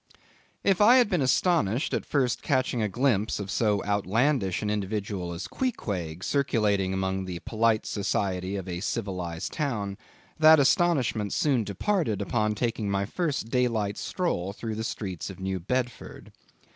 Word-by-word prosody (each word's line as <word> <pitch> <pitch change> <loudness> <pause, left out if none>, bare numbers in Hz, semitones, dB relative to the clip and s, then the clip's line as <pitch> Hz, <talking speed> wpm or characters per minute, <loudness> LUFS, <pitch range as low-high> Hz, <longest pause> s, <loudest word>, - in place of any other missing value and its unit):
If 195 -1 +2
I 230 +4 +8
had 245 -4 +4
been 180 -5 +2
astonished 130 - +2
at - - -2
first 130 -4 +1
catching 130 -4 0
a 105 - 0
glimpse 110 -2 +1
of 100 -1 -5
so 105 -3 +1
outlandish 105 +1 +1
an 105 - 0
individual 100 -3 -3
as 85 +2 -5
Queequeg 95 - -3
circulating 105 -9 +1
among 95 0 -1
the 90 -2 -5
polite 115 -1 +1
society 95 -2 -1
of 95 -2 -5
a 90 -1 -4
civilized 90 -4 -3
town, 105 -10 -2 0.4
that 155 0 +8
astonishment 135 - +2
soon 135 -6 +2
departed 110 - -1
upon 105 +1 0
taking 110 -2 -1
my 100 0 0
first 150 - -2
daylight 115 -5 +1
stroll 100 - -2
through 110 +1 -5
the 110 +1 -3
streets 95 -6 -4
of 95 -1 -9
New 95 0 -2
Bedford. 125 +6 -4
105 Hz, 150 wpm, -27 LUFS, 95-130 Hz, 0.4 s, I